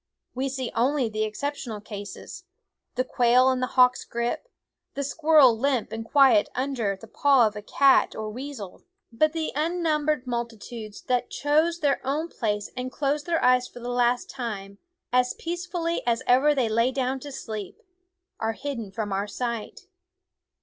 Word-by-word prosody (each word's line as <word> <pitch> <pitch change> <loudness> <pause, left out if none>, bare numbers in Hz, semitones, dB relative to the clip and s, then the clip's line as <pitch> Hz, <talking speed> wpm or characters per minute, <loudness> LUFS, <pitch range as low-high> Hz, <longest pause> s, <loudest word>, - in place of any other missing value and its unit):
We 265 +2 -2
see 260 -2 -4
only 255 0 +1
the 215 0 -1
exceptional 230 0 -4
cases, 205 - -9 0.5
the 255 - +1
quail 255 +1 +4
in 260 - -1
the 255 - 0
hawk's 250 0 +5
grip, 235 - -3 0.5
the 280 - -2
squirrel 300 -3 +5
limp 255 -1 0
and 225 0 -4
quiet 250 -3 +5
under 250 -6 -1
the 225 - -12
paw 275 -2 +4
of 210 -1 -3
cat 275 -1 +4
or 215 0 -4
weasel; 250 -5 -8 0.3
but 310 +7 +2
the 320 -1 -2
unnum 310 -1 0
bered 300 -4 +1
multitudes 235 -3 -6
that 250 -1 0
choose 315 +4 +1
their 285 -2 +1
own 295 +5 -1
place 210 -6 -2
and 255 0 -4
close 285 +1 -1
their 335 -1 0
eyes 250 0 +4
for - - -12
the 240 +1 -6
last 245 0 +1
time, 200 -6 -6 0.3
as 250 0 +2
peace 345 +2 -5
fully 340 -1 -2
as 230 -1 +1
ever 280 +4 +4
they 255 -4 +2
lay 230 +3 +2
down 265 0 -1
to 285 +2 -8
sleep, 215 -7 -6 0.6
are 225 0 -1
hidden 235 -6 -5
from 205 -1 -3
our 200 +2 -1
sight. 235 +1 -4
250 Hz, 165 wpm, -26 LUFS, 225-285 Hz, 0.6 s, hawk's